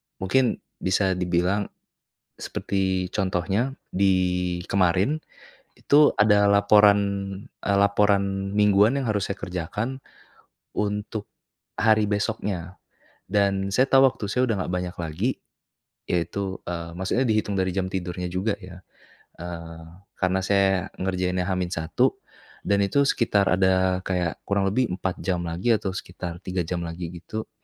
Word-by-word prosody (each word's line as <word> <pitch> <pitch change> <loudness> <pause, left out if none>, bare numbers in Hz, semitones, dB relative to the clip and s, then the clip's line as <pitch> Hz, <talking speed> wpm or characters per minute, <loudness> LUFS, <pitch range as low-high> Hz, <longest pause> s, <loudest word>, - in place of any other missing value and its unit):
mungkin 125 +6 +1 0.2
bisa 95 +1 +1
dibilang, 90 +2 0 0.7
seperti 95 -2 -2
contohnya 95 +7 -1 0.2
di 90 -2 +1
kemarin, 95 - +2 0.5
itu 145 +1 +4
ada 105 -1 +5
laporan, 100 0 +6 0.6
eee, 100 -1 +2
laporan 100 -1 +2
mingguan 105 +5 +4
yang 130 - -2
harus 100 -2 0
saya - - -11
kerjakan, 105 +9 -4 0.7
untuk, 105 +1 -3 0.5
hari 110 -1 +3
besoknya, 100 -4 -3 0.5
dan 100 -1 +1
saya 130 +7 +3
tahu 135 0 +6
waktu 125 -6 +2
saya 125 +4 +1
udah - - +1
nggak 90 - -4
banyak 90 +1 -3
lagi, 85 +8 -1 0.8
yaitu, 95 +2 -2
eee, 85 -1 -5
maksudnya 110 +8 0
dihitung 105 -3 0
dari 95 -1 -1
jam 95 -1 -1
tidurnya 90 -1 -4
juga 95 +4 -1
ya, 90 -2 -12 0.6
eee, 85 -1 -8 0.4
karena 95 0 +2
saya 95 -2 +2 0.2
ngerjainnya 90 -1 -1
H-1, 90 -3 0 0.4
dan 100 - +1
itu 140 +8 +2
sekitar 100 -4 +2
ada 95 0 +2
kayak 90 -3 -1
kurang 100 -1 +1
lebih 115 -2 0
4 95 0 -3
jam 90 0 -2
lagi 90 +8 +1
atau 105 -2 -1
sekitar 90 -2 -6
3 90 0 -1
jam 85 0 -3
lagi 85 0 -5
gitu, 90 +6 -7
95 Hz, 130 wpm, -25 LUFS, 90-105 Hz, 0.8 s, laporan